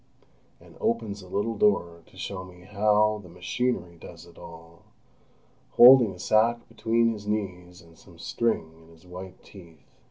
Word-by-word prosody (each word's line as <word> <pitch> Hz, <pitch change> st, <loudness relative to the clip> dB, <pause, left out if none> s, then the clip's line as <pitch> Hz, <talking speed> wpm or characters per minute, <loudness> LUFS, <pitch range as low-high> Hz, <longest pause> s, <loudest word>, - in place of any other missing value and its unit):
and -, -, -18 dB
opens 110 Hz, -3 st, -2 dB
a 95 Hz, -, -14 dB
little 105 Hz, +5 st, -2 dB
door 90 Hz, -5 st, +1 dB
to -, -, -20 dB
show 95 Hz, -1 st, -6 dB
me 90 Hz, -1 st, -15 dB
how 105 Hz, +2 st, +1 dB
"the 90 Hz, -, -15 dB
machinery 90 Hz, 0 st, -3 dB
does 85 Hz, -1 st, -12 dB
it 85 Hz, -1 st, -18 dB
all," 85 Hz, -1 st, -14 dB, 0.9 s
holding 120 Hz, -3 st, +8 dB
a 90 Hz, -, -11 dB
sack 110 Hz, +5 st, +1 dB
between 115 Hz, +1 st, 0 dB
his 105 Hz, -1 st, -10 dB
knees 90 Hz, -4 st, -5 dB
and 85 Hz, -1 st, -20 dB
some 85 Hz, -4 st, -18 dB
string 85 Hz, -3 st, -2 dB
in 80 Hz, -, -20 dB
his 80 Hz, +1 st, -20 dB
white 90 Hz, +1 st, -11 dB
teeth. 85 Hz, -6 st, -17 dB
95 Hz, 160 wpm, -26 LUFS, 85-110 Hz, 0.9 s, holding